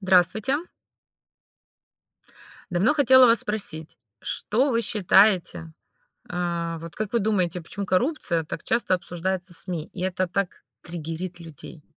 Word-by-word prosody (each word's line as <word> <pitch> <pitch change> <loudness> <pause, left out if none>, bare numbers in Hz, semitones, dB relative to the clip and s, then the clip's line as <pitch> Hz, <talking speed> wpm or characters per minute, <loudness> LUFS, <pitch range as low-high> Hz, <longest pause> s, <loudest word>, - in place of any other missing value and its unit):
Здравствуйте. 190 - +3 2.1
Давно 190 +11 +2
хотела 260 -3 +6
вас 230 -1 +5
спросить, 195 -7 -3 0.2
что 260 +7 0
вы 230 -2 +1
считаете 190 - +2 0.6
э, 170 -1 -3
вот 165 0 -9
как 215 0 -4
вы 235 - +3
думаете, 185 -5 0
почему 200 +5 -5
коррупция 190 - +1
так 155 - -7
часто 230 -5 +2
обсуждается 180 +1 -3
СМИ, 165 -2 -2
и 180 - -7
это 185 0 -1
так 185 +1 -3 0.2
триггерит 170 +2 -6
людей? 160 -1 -12
185 Hz, 120 wpm, -24 LUFS, 170-215 Hz, 2.1 s, хотела